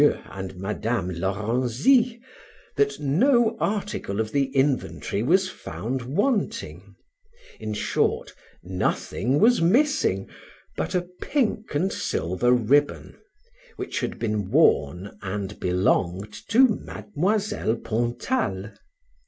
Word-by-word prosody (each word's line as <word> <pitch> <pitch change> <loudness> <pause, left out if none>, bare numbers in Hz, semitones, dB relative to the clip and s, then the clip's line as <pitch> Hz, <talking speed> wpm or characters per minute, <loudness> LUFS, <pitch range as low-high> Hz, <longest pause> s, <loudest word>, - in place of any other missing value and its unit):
and 95 -1 -6
Madam 95 +1 -2
Lorenzy, 120 - +1 0.6
that 140 0 +1
no 225 - +3
article 200 - -2
of 110 -1 -1
the 140 -1 +2
inventory 135 -6 0
was 185 - +3
found 130 -7 -5
wanting; 200 - -2 0.6
in 110 - -4
short, - - 0 0.3
nothing 95 - -1
was 235 0 +5
missing 210 - +2 0.5
but 80 - -2
a 180 -1 0
pink 225 - -1
and 185 +7 +1
silver 90 +9 0
ribbon, 130 +5 +2 0.6
which - - -4
had - - -3
been 105 -4 -2
worn, 100 - +2
and 100 +1 -4
belonged 90 +2 0
to 255 +4 +6
Mademoiselle 205 - -1
Pontal. 120 - -2
125 Hz, 100 wpm, -25 LUFS, -, 0.6 s, to